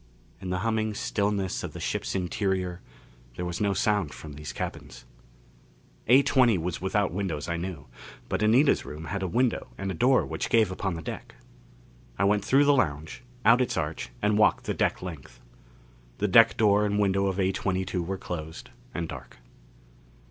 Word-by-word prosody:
In 95 Hz, -, -5 dB
the 90 Hz, -, 0 dB
humming 110 Hz, -1 st, 0 dB
stillness 100 Hz, -3 st, -1 dB
of -, -, -6 dB
the -, -, -7 dB
ship's -, -, -3 dB
interior 95 Hz, -1 st, -1 dB, 0.5 s
there 90 Hz, -, -4 dB
was 90 Hz, +1 st, -4 dB
no 100 Hz, -1 st, +2 dB
sound 100 Hz, -9 st, 0 dB
from 75 Hz, -2 st, -9 dB
these 75 Hz, +1 st, -7 dB
cabins. -, -, -7 dB, 1.0 s
A20 130 Hz, -4 st, +5 dB
was 85 Hz, +1 st, -3 dB
without 95 Hz, -1 st, 0 dB
windows, 90 Hz, -6 st, -3 dB
I 85 Hz, 0 st, -2 dB
knew. 85 Hz, -5 st, -5 dB, 0.4 s
But -, -, -2 dB
Anita's 120 Hz, +7 st, +4 dB
room 75 Hz, +2 st, -8 dB
had 100 Hz, -, -2 dB
a 95 Hz, -, -1 dB
window 120 Hz, +6 st, 0 dB
and 95 Hz, 0 st, -3 dB
a -, -, -3 dB
door 125 Hz, +9 st, +3 dB
which -, -, -4 dB
gave 110 Hz, -4 st, +3 dB
upon 95 Hz, -1 st, -2 dB
the 80 Hz, -, -7 dB
deck. -, -, -7 dB, 0.8 s
I -, -, +1 dB
went 100 Hz, 0 st, +2 dB
through 135 Hz, +6 st, +4 dB
the 145 Hz, -, +5 dB
lounge, 80 Hz, -, -1 dB, 0.2 s
out 115 Hz, +3 st, +6 dB
its 125 Hz, -, -1 dB
arch 75 Hz, -5 st, -3 dB
and 105 Hz, 0 st, +2 dB
walked 105 Hz, -, +4 dB
the -, -, -2 dB
deck -, -, 0 dB
length. 85 Hz, -7 st, -9 dB, 0.8 s
The -, -, 0 dB
deck -, -, +6 dB
door 105 Hz, -1 st, +4 dB
and 105 Hz, -1 st, 0 dB
window 100 Hz, -1 st, +2 dB
of 95 Hz, -1 st, -2 dB
A22 95 Hz, -1 st, -1 dB
were 95 Hz, +3 st, -3 dB
closed 80 Hz, -4 st, -7 dB, 0.2 s
and 85 Hz, -1 st, -2 dB
dark. -, -, -10 dB
95 Hz, 175 wpm, -27 LUFS, 90-105 Hz, 1.0 s, out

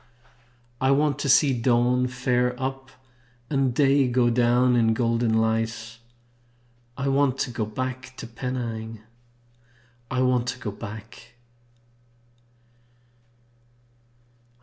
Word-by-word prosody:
I 130 Hz, -, +2 dB
want 145 Hz, +1 st, +2 dB
to 140 Hz, -, -2 dB
see 135 Hz, +1 st, +5 dB
dawn 125 Hz, +1 st, +2 dB
fare 125 Hz, -1 st, 0 dB
up 135 Hz, 0 st, -4 dB, 0.6 s
and 135 Hz, -3 st, +2 dB
day 135 Hz, +1 st, +3 dB
Go 120 Hz, -1 st, +2 dB
down 125 Hz, +1 st, +3 dB
in 115 Hz, -2 st, +3 dB
golden 115 Hz, 0 st, +1 dB
light; 115 Hz, 0 st, -1 dB, 1.0 s
I 140 Hz, 0 st, -2 dB
want 135 Hz, -1 st, +2 dB
to 125 Hz, -, -2 dB
go 115 Hz, -2 st, -3 dB
back 130 Hz, +3 st, -5 dB
to -, -, -7 dB
Penang! 115 Hz, -2 st, -5 dB, 1.1 s
I 130 Hz, 0 st, 0 dB
want 125 Hz, -1 st, +1 dB
to 125 Hz, 0 st, -3 dB
go 115 Hz, -4 st, -5 dB
back! 110 Hz, +3 st, -10 dB
125 Hz, 105 wpm, -25 LUFS, 115-130 Hz, 1.1 s, see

